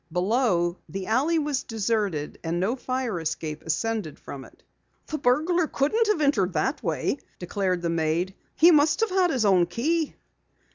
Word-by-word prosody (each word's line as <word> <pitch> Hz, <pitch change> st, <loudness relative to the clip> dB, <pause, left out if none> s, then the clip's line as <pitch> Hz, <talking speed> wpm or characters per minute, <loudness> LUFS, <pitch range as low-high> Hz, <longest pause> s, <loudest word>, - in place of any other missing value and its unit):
Below, 180 Hz, -2 st, +1 dB
the 195 Hz, -1 st, -5 dB
alley 275 Hz, -, +2 dB
was 290 Hz, -4 st, 0 dB
deserted, 210 Hz, -8 st, -2 dB
and 165 Hz, +1 st, -1 dB
no 205 Hz, +7 st, 0 dB
fire 255 Hz, -7 st, -2 dB
escape 155 Hz, -1 st, -4 dB
ascended 185 Hz, 0 st, -2 dB
from 135 Hz, -2 st, -9 dB
it. -, -, -20 dB, 0.4 s
"The 310 Hz, -, -4 dB
burglar 315 Hz, +7 st, +2 dB
couldn't 425 Hz, +14 st, +1 dB
have 420 Hz, -7 st, +1 dB
entered 205 Hz, -11 st, +2 dB
that 265 Hz, -, 0 dB
way," 280 Hz, -, -1 dB, 0.2 s
declared 180 Hz, -1 st, -2 dB
the 170 Hz, -, 0 dB
maid. 165 Hz, +3 st, 0 dB, 0.2 s
"He 340 Hz, +2 st, +7 dB
must 300 Hz, +2 st, +4 dB
have 450 Hz, -3 st, +1 dB
had 370 Hz, -1 st, +3 dB
his 255 Hz, -8 st, +1 dB
own 185 Hz, -4 st, +4 dB
key." 300 Hz, -, -1 dB
225 Hz, 160 wpm, -25 LUFS, -, 0.4 s, He